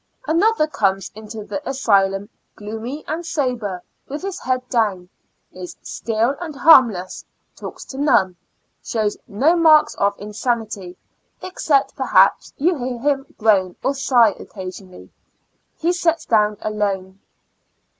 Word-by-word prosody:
Another 360 +2 +2
comes 195 - -1
into 215 0 -8
the 290 - -5
asylum 200 -6 +1 0.3
gloomy 225 +7 -7
and 320 +3 -3
sober, 250 - -2 0.2
with 290 +5 -6
his 390 -1 -4
head 255 0 -2
down; 205 -8 0 0.4
is 180 -1 -9
still 230 +4 -1
and 320 -4 -6
harmless; 240 - +4 0.3
talks - - -9
to 265 - -8
none; 235 -11 +3 0.5
shows 215 -3 -1
no 275 +12 +2
"marks 315 -3 +5
of 200 0 +1
insanity; 210 -3 -3 0.5
except, 310 -6 0
perhaps, - - +3
you 340 +5 +2
hear 245 0 -3
him 275 +2 -2
groan 200 -5 +2
or 275 - +1
sigh 250 -5 +4
occasionally; 185 -1 -10 0.7
he 340 +2 +1
sets 335 -2 0
down 210 -2 +2
alone. 195 -3 -3
230 Hz, 125 wpm, -20 LUFS, 200-285 Hz, 0.7 s, marks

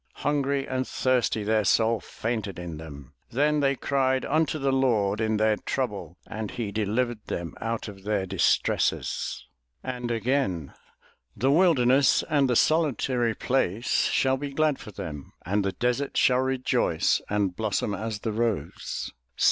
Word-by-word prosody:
"Hungry 140 -1 +1
and 130 0 -2
thirsty 125 -4 +1
their 110 +1 +2
soul 115 +2 +3
fainted 110 -4 -4
in 85 -3 -6
them; 70 -4 -10 0.2
"Then 150 +4 +2
they 140 -1 +2
cried 130 -1 0
unto 155 0 +1
the 135 -2 0
Lord 115 -6 +2
in 110 -1 +1
their 110 0 +2
trouble 105 -9 -3
and 110 -1 -5
he 115 -4 -4
de 105 +1 -1
livered 115 +1 -1
them 85 -1 -4
out 115 0 -2
of 100 -2 -10
their 100 -1 -1
distresses." 95 -7 0 0.4
And 125 -2 -4
again: 115 - -1 0.6
"The 135 +3 +2
wilderness 140 -5 +4
and 145 -4 +2
the 125 - +2
solitary 130 -6 +2
place 120 -2 +1
shall 130 0 +2
be 140 0 -5
glad 155 -1 +1
for 110 - -10
them; 75 -7 -7
and 100 +3 +1
the 95 -1 -1
desert 125 +3 -1
shall 125 -1 +4
rejoice 130 -1 +1
and 100 -3 0
blossom 105 -1 -1
as 105 +1 -4
the 110 - -2
rose. 115 -1 -2
115 Hz, 150 wpm, -26 LUFS, 105-135 Hz, 0.6 s, wilderness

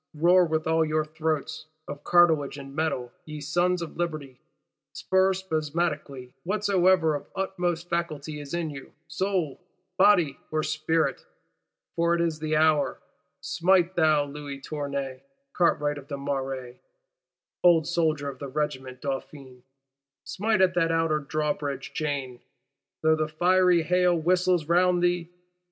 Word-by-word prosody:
Roar 175 +4 +5
with 160 -1 -1
all 160 0 +2
your 155 0 0
throats, 155 0 -3 0.2
of 145 - -8
cartilage 160 -5 +3
and 135 -1 -9
metal, 140 -6 -2
ye 155 -1 -8
Sons 175 +4 0
of 165 - -9
Liberty; 155 -7 -4 0.5
stir 190 0 +2
spasmodically 155 -6 -3
whatsoever 185 -4 +2
of 145 - -5
utmost 175 -3 -2
faculty 155 -3 -3
is 145 -1 -9
in 165 -3 -2
you, 135 -2 -10
soul, 185 -7 -2 0.4
body 180 -8 +4
or 155 0 -1
spirit; 160 +1 0 0.7
for 170 0 +2
it - - -2
is 165 -2 -1
the 155 0 -1
hour! 155 -1 +2 0.4
Smite, 180 +1 +2
thou 155 -3 +3
Louis 145 -1 -7
Tournay, 140 -2 -4 0.3
cartwright 145 -4 +1
of 140 - -14
the 140 - -5
Marais, 135 -3 -4 0.8
old 170 -3 +5
soldier 160 -4 0
of 135 -2 -6
the 140 - -5
Regiment 130 -3 -4
Dauphine; 135 -2 -6 0.6
smite 215 0 0
at 185 -1 +4
that 165 -2 +1
Outer 165 -2 +1
Drawbridge 145 -2 -3
chain, 140 -5 -3 0.6
though 160 0 +4
the 155 0 -1
fiery 180 +2 +3
hail 180 +1 +3
whistles 180 0 +2
round 180 +1 +3
thee! 175 -1 +1
155 Hz, 135 wpm, -26 LUFS, 145-175 Hz, 0.8 s, Roar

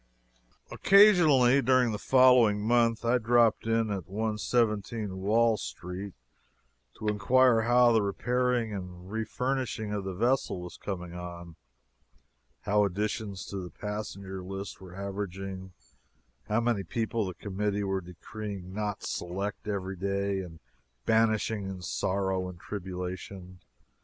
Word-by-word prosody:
Occasionally, 155 -11 +6
during 130 -1 +3
the 105 - -3
following 125 -5 +5
month, 115 0 +2
I 125 +2 +3
dropped 115 -2 +3
in 115 -1 +1
at 95 -5 -4
117 105 -1 -1
Wall 110 +3 +3
Street 90 +8 -7 0.8
to 110 - -5
inquire 115 +3 +4
how 120 +1 +5
the 110 -1 +4
repairing 120 +3 0
and 90 -1 -8
refurnishing 110 -1 -2
of 100 -1 -2
the 95 -1 -5
vessel 120 -1 +1
was 90 0 -8
coming 90 -3 -5
on, 85 -1 -8 1.1
how 105 0 +2
additions 100 0 -2
to 100 - -6
the 90 -2 -5
passenger 100 -2 -6
list 95 +2 -7
were 90 -1 -11
averaging, 95 -1 -5 0.8
how 110 +2 +1
many 115 -4 +1
people 110 +5 -2
the 90 - -6
committee 100 0 -2
were 95 -1 -1
decreeing 95 +1 -8
not 105 -1 -3
"select" 100 +5 -4
every 95 -2 -3
day 100 +1 -1
and 85 -3 -8 0.5
banishing 110 -2 +2
in 95 -2 -7
sorrow 95 0 -1
and 90 -2 -11
tribulation. 90 -1 -6
105 Hz, 125 wpm, -29 LUFS, 95-115 Hz, 1.1 s, Occasionally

